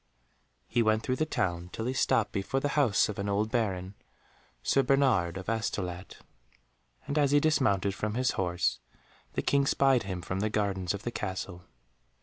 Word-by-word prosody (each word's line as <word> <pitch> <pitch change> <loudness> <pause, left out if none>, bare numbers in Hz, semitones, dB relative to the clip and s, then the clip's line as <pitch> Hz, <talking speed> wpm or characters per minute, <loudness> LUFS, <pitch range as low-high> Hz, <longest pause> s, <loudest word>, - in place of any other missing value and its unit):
He 120 - +1
went 110 0 +2
through 130 - -1
the 155 - 0
town 90 - -2
till 110 - -4
he 130 - -1
stopped 115 -4 +2
before 100 +7 -1
the 145 - -1
house 130 -9 +3
of 105 0 -5
an 100 0 -2
old 105 +2 0
Baron, 95 -6 -1 0.7
Sir 135 - +3
Bernard 125 -12 +2
of 95 - -8
Astolat, 100 -5 -3 0.9
and 145 +2 0
as 145 -2 +3
he 145 +1 +5
dismounted 105 -11 +2
from 105 +2 -3
his 125 +1 +2
horse, 90 -1 0 0.5
the - - -2
King 140 -1 +2
spied 135 -3 +3
him 95 -3 -5
from 95 +2 -3
the 110 +2 0
gardens 100 -3 -1
of 100 - -8
the 120 - -3
castle. 95 -4 -5
105 Hz, 175 wpm, -29 LUFS, 95-130 Hz, 0.9 s, he